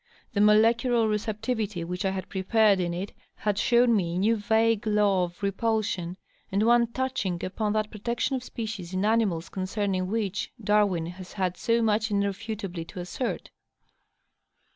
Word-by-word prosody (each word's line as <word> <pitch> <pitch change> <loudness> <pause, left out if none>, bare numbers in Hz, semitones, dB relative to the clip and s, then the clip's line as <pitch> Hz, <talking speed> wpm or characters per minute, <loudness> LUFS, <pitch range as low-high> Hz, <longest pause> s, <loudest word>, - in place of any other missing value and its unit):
The 205 - +2
molecular 230 +2 +4
receptivity 215 -2 -2
which 180 +3 -4
I - - +3
had 190 -1 -4
prepared 200 +1 +3
in 175 -1 -1
it 180 +4 -4 0.2
had 205 -1 -1
shown 240 -1 +4
me 170 -4 0
a - - -1
new 215 +5 +3
vague 220 +1 +1
law 205 -3 +3
of 175 +3 -12
repulsion, 200 -3 -1 0.3
and 200 +2 +2
one 235 0 +5
touching 235 -8 -2
upon 210 +3 -1
that 215 0 -1
protection 235 +5 -2
of 255 - -4
species 210 -8 -6
in 190 +2 +1
animals 210 -7 +1
concerning 190 -1 -2
which 210 -1 -2
Darwin 205 -5 +2
has 180 +2 -9
had 185 -3 -1
so 230 +4 +1
much 215 0 +1
irrefutably 200 -2 -2
to 180 - -9
assert. 180 +8 -4
210 Hz, 155 wpm, -27 LUFS, 185-225 Hz, 0.3 s, one